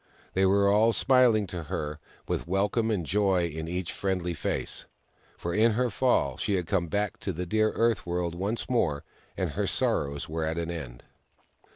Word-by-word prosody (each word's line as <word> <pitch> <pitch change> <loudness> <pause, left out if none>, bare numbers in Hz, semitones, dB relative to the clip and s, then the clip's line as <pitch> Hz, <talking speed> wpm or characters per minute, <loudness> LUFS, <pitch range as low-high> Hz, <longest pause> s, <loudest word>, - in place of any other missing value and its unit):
They 95 0 +3
were 100 +1 +4
all 110 +3 +4
smiling 125 -6 +4
to 85 -3 -6
her, 75 +2 -4 0.3
with - - -2
wel 95 +3 +1
come 115 0 0
and 100 -7 0
joy 95 -3 +1
on 80 0 -4
each 90 0 -3
friendly 90 -3 -1
face. 75 - -3 0.5
For 85 - -3
in 110 +2 +4
her 125 +1 +1
fall 125 +4 +1
she 105 - 0
had 90 -2 -1
come 85 0 0
back 100 +3 -1
to 95 - -3
the 90 +1 -4
dear 110 +4 +2
Earth 115 -3 +1
World 85 -1 -2
once 100 +6 -2
more, 80 - +1 0.3
and - - -1
her - - -1
sorrows 70 0 0
were 80 +1 -3
at 80 +1 -2
an 85 0 -2
end. 65 -8 -7
95 Hz, 190 wpm, -28 LUFS, 85-105 Hz, 0.5 s, were